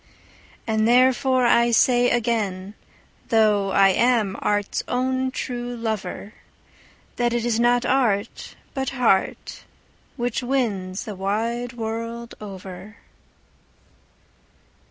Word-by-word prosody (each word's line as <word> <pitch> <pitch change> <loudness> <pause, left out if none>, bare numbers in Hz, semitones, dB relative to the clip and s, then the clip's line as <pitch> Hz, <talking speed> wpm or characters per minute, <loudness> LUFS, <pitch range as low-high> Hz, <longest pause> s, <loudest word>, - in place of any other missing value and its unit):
And 220 -1 +1
therefore 255 +1 +3
I 235 0 +4
say 245 +1 +4
again, 210 -5 -1 0.6
though 210 -3 +3
I 195 0 +5
am 220 -1 +2
art's 205 -1 -1
own 260 +1 0
true 245 -1 -5
lover, 220 -2 -4 0.8
That 240 -1 +1
it 240 -1 -1
is 230 -1 0
not 240 +1 +3
art, 230 -5 0 0.2
but 265 -1 -2
heart, 210 -6 0 0.5
which 245 0 -2
wins 215 -8 -2
the 215 - -6
wide 225 +6 -2
world 230 +1 -5
over. 195 0 -9
230 Hz, 100 wpm, -23 LUFS, 205-245 Hz, 0.8 s, I